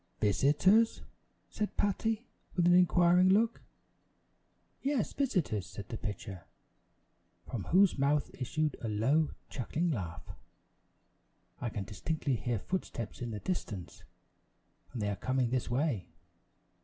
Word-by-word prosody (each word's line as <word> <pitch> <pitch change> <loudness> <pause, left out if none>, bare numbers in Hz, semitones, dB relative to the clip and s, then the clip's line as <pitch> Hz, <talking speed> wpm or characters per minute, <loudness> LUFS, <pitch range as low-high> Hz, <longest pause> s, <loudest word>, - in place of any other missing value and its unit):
"Visitors?" 150 - +4 0.4
said 210 -1 -4
Patty 220 +3 0 0.3
with 175 -2 +3
an 175 - +6
inquiring 180 0 +5
look. 225 +4 +3 1.2
"Yes, 275 -5 0
visitors," 170 - 0
said 100 - -9
the 115 - -4
pitcher, 100 -3 -6 1.0
from 110 -6 -4
whose 185 -4 +4
mouth 140 +1 +2
issued 150 +3 -1
a 115 - -3
low, 135 +9 +2 0.2
chuckling 160 +7 -1
laugh; 90 - -4 1.3
"I 120 - -2
can 105 -2 -4
distinctly 135 - -2
hear 120 0 -1
footsteps 120 - -4
in 120 - -3
the 105 -2 -4
distance, 105 - -4 0.9
and 115 - -3
they - - 0
are - - -2
coming 125 +3 0
this 130 -1 0
way. 125 - 0
140 Hz, 120 wpm, -32 LUFS, 110-180 Hz, 1.3 s, an